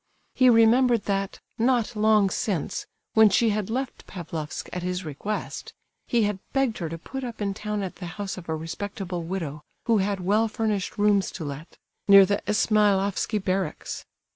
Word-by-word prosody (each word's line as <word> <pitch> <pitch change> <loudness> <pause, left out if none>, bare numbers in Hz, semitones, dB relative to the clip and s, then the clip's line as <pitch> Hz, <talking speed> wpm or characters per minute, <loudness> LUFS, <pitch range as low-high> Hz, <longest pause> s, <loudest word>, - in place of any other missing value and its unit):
He 255 -1 +5
remembered 235 0 +5
that, 195 -1 -2 0.2
not 240 -1 +2
long 210 -2 +4
since, 195 - -2 0.3
when 220 -1 +7
she 225 +3 +3
had 210 -1 -2
left 260 +3 -4
Pavlofsk 165 -4 -6
at 180 - -3
his 180 0 -3
request, 160 +8 -5 0.3
he 235 -2 +2
had 205 -2 -1
begged 270 -5 +1
her 165 -3 -3
to 165 - -5
put 265 +10 -7
up 240 -3 -6
in 200 -2 -1
town 210 0 -3
at 185 - -6
the 180 - -6
house 200 -2 -3
of 175 -3 -10
a 160 - 0
respectable 180 +2 -5
widow, 165 -4 -4 0.2
who 225 -2 +3
had 195 0 0
well 210 +5 +2
furnished 215 -3 -2
rooms 205 -1 +3
to 165 - -5
let, 145 +3 -8 0.3
near 200 -1 +9
the 200 +1 0
Ismailofsky 210 -1 +2
barracks. 190 0 -2
205 Hz, 170 wpm, -25 LUFS, 185-220 Hz, 0.3 s, near